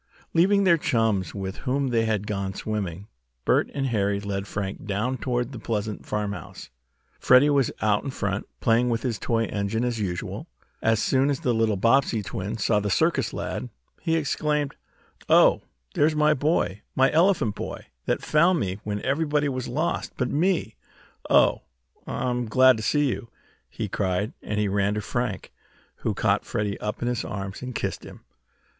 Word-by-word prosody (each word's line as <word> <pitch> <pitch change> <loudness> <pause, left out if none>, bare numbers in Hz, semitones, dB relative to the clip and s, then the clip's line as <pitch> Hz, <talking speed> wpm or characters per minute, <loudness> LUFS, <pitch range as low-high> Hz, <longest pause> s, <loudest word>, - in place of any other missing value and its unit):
Leaving 200 +4 +4
their 170 -3 +5
chums 110 - 0
with 95 -1 -4
whom 135 +1 -1
they 115 -2 +2
had 105 -2 0
gone 100 -2 -3
swimming, 100 -4 -4 0.4
Bert - - +3
and 135 - -2
Harry 100 -5 0
led 100 -1 -4
Frank 100 -1 -5
down 110 +6 -1
toward 120 0 -2
the 125 - -7
pleasant 105 -1 -3
farmhouse. 100 -2 -4 0.5
Freddie 130 +4 +6
was 140 -4 +2
out 105 -1 +2
in 140 - -4
front, 105 -5 -3
playing 115 +2 +3
with 115 -1 -1
his 120 -4 -2
toy 115 -1 0
fire - - -8
engine 105 +3 -1
as 120 -2 -1
usual. 90 -5 -4 0.3
As 115 0 +3
soon 135 +3 +2
as 140 - -1
the 125 - +1
little 110 -2 +1
Bobbsey 115 0 +3
twin 100 +3 -4
saw 105 0 +2
the 105 0 -2
circus - - +2
lad, - - -4 0.3
he 165 - +1
exclaimed: 150 -2 0 0.5
"Oh, - - +6 0.3
there's 155 +1 +2
my 150 0 +4
boy 145 - 0
my 135 +1 +4
elephant 165 - +3
boy - - -6 0.2
that - - 0
found 170 +4 +3
me 95 -2 -2
when 105 -1 -3
everybody 145 +1 +1
was 130 -2 -3
lost 155 +8 -2
but 125 -1 -1
me. 165 - +1 0.5
Oh, - - +4 0.5
I'm 125 -1 -1
glad 130 +3 +6
to - - -4
see 145 +6 +2
you!" 120 -2 -3 0.4
he - - -4
cried, 95 +2 -1
and 105 0 -3
he 105 - +1
ran 100 +1 +1
to 105 - -1
Frank, 120 -2 -3 0.5
who - - -2
caught - - +1
Freddie 105 -1 -2
up 105 +2 -3
in - - 0
his 125 -1 -1
arms, 95 -1 -5
and 125 -1 -6
kissed - - -3
him. - - -11
115 Hz, 175 wpm, -25 LUFS, 100-135 Hz, 0.5 s, Freddie